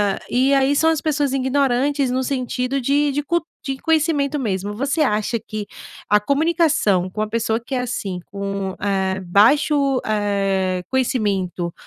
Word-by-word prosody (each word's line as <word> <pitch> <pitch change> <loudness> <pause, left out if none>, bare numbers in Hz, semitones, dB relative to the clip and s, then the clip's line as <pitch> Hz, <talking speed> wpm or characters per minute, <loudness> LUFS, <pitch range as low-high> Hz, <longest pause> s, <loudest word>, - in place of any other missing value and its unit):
Hã, 205 -1 +1
e 265 +3 +2
aí 275 +1 +3
são 320 +3 +3
as 315 -2 -1
pessoas 290 -3 0
ignorantes, 270 0 +1
no 255 +1 0
sentido 255 0 -2
de 285 +3 +2
de 290 +2 -2
cu 340 +2 0 0.2
de 270 -1 -3
conhecimento 305 -2 +1
mesmo. 205 -4 -2
Você 275 +7 -1
acha 225 -3 +1
que 215 -1 -6 0.4
a 210 - +5
comunicação 285 - +1
com 210 +3 -4
uma 215 - 0
pessoa 225 0 0
que 240 +3 -9
é - - 0
assim, 205 -7 -4
com, 195 -1 -4
eh, 190 -2 0
baixo, 275 - +3
eh, 195 -3 0
conhecimento 195 -9 -1
250 Hz, 155 wpm, -20 LUFS, 200-280 Hz, 0.4 s, a